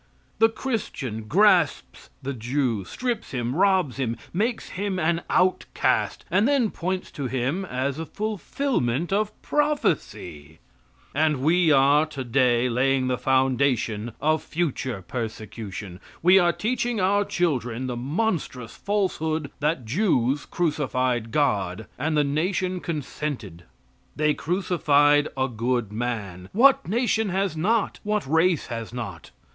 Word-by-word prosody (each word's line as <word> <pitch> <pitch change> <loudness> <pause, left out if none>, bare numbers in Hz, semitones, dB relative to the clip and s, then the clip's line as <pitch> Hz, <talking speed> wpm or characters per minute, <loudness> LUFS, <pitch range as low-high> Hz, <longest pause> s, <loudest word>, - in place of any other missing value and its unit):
The 225 - +6
Christian 140 - -4
grasps 180 - +2
the 140 +1 -3
Jew, 120 -2 -1
strips 245 - -3
him, 125 0 -2
robs 185 -7 +2
him, 120 -4 -2 0.2
makes 225 +6 -1
him 195 0 -3
an 170 0 +1
outcast, 185 0 +1
and 210 +4 +3
then 270 -6 +2
points 185 +2 -3
to 140 -3 -4
him 135 +9 -1
as 135 -1 -2
a 165 - -5
fulfillment 205 - -1
of 215 +1 -1
prophecy; 140 - -1 0.6
and 150 -2 +1
we 165 +1 +4
are 145 +2 +5
today 125 -3 +1
laying 130 +1 +1
the 125 - 0
foundation 130 -4 +1
of 155 +1 +2
future 130 - -3
persecution 110 -5 -6 0.2
we 185 +3 +7
are 175 -2 +4
teaching 240 +3 -1
our 200 +2 +3
children 130 - -1
the 125 -1 -3
monstrous 140 - -2
falsehood 160 -7 -1
that 150 -4 0
Jews 140 - +1
crucified 130 -8 0
God, 105 -8 0
and 155 +3 0
the 150 - +4
nation 180 +5 -1
consented. 140 - -5 0.5
They 150 0 +2
crucified 145 -4 +2
a 130 0 +1
good 120 -2 -1
man. 105 -6 -4
What 265 +1 +5
nation 220 0 +1
has 190 -2 0
not? 210 +7 0
What 210 -3 -1
race 160 +3 +2
has 115 -2 -6
not? 105 -9 -7
145 Hz, 125 wpm, -25 LUFS, 125-185 Hz, 0.6 s, we